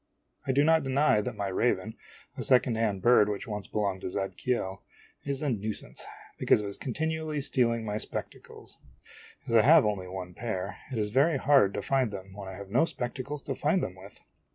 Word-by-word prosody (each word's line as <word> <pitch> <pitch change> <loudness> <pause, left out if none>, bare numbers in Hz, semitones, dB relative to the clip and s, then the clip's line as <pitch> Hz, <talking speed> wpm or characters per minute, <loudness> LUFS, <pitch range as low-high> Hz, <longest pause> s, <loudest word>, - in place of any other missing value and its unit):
I - - +3
do 140 +2 +3
not 160 +1 +4
deny 135 -4 +3
that 120 +2 -4
my 100 -1 -3
raven, 95 - 0 0.4
a - - -5
second 125 -1 +4
hand 105 -4 -1
bird 120 -4 +6
which 100 -1 -3
once 105 -4 -5
belonged 100 -3 -1
to - - -3
Zadkiel, 95 +1 -2 0.4
is 140 0 -2
a 145 - +1
nuisance, 110 -1 -4 0.4
because - - +4
of - - -5
his 100 0 -5
continually 155 +3 -2
stealing 115 -4 +1
my 105 0 -2
spectacles. - - -7 0.7
As - - -4
I 115 - +7
have 150 +2 +7
only 100 -3 -1
one 90 -1 -7
pair, 100 -3 -4
it 125 - -3
is 105 -1 -1
very 140 +5 +3
hard 135 -8 +4
to - - -3
find 135 -3 +1
them 95 -1 -8
when 100 -1 -8
I 95 - -7
have 100 0 -9
no 135 +9 +4
spectacles 135 +1 -4
to 135 - -3
find 150 +7 +1
them 90 - -3
with. 95 +2 -13
115 Hz, 200 wpm, -29 LUFS, 100-135 Hz, 0.7 s, I